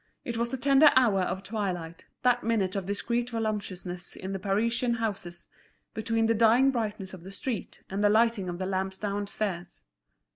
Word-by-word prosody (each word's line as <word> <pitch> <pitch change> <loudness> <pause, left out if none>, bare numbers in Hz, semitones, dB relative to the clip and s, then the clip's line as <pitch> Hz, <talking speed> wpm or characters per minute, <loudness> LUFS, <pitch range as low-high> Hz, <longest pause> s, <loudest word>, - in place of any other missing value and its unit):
It 235 - -3
was 235 +1 0
the 265 - -3
tender 275 +3 +6
hour 225 -7 +4
of 190 +1 -2
twilight, 185 -6 -4 0.2
that 245 -1 +3
minute 210 -5 0
of 195 -2 -3
discreet 235 +4 -1
voluptuousness 200 -6 -4
in 190 +1 -5
the 195 - -3
Parisian 230 +5 +1
houses, 195 -7 -4 0.5
between 225 +1 0
the 225 - +3
dying 230 +4 +5
brightness 210 -6 -3
of 185 - -9
the 190 +3 -10
street 225 +2 -5
and 195 +2 -2
the 205 - +5
lighting 220 -3 +3
of 175 - -4
the 185 - -3
lamps 190 0 -2
downstairs. 200 - -3
210 Hz, 175 wpm, -28 LUFS, 190-230 Hz, 0.5 s, tender